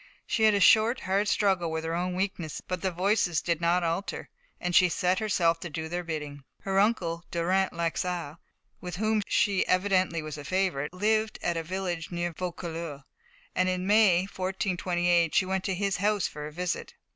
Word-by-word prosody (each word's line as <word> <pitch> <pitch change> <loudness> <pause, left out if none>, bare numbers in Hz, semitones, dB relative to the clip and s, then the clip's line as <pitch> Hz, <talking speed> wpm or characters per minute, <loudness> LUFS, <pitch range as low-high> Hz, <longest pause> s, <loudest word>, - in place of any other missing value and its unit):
She - - -1
had 215 -1 +5
a - - +2
short, 220 +5 +5
hard 195 +3 0
struggle 190 -5 +2
with 160 0 -3
her 165 0 -2
own 180 +1 -1
weakness, 185 -5 -3
but 180 -2 -5
the 190 - 0
voices 185 -1 +1
did 170 -1 -1
not 175 +1 +2
alter, 170 +4 -3 0.3
and 180 0 -2
she 180 -1 +6
set 180 +2 +1
herself 175 -6 +1
to 175 - -6
do 160 +1 -4
their 175 +2 -3
bidding. 150 -4 -5 0.2
Her 195 0 0
uncle, 180 -6 +1
Durant 185 +3 +1
Laxart, 170 -2 -2 0.4
with 180 -1 -6
whom 215 +2 +1
she 200 -5 +2
evidently 185 -3 +1
was 155 -1 -6
a - - -7
favourite, 180 -4 -1
lived 215 +4 0
at 175 - 0
a 165 - -1
village 175 -1 -4
near 175 -1 -3
Vaucouleurs, 170 -4 -5 0.5
and 185 0 +1
in 185 0 -1
May, 205 -4 +5
1428, 180 -3 0
she 185 - +4
went 190 0 -1
to 195 - 0
his 195 +1 -1
house 205 0 +1
for 150 0 -7
a - - -9
visit. 180 +2 -4
180 Hz, 185 wpm, -28 LUFS, 170-195 Hz, 0.5 s, she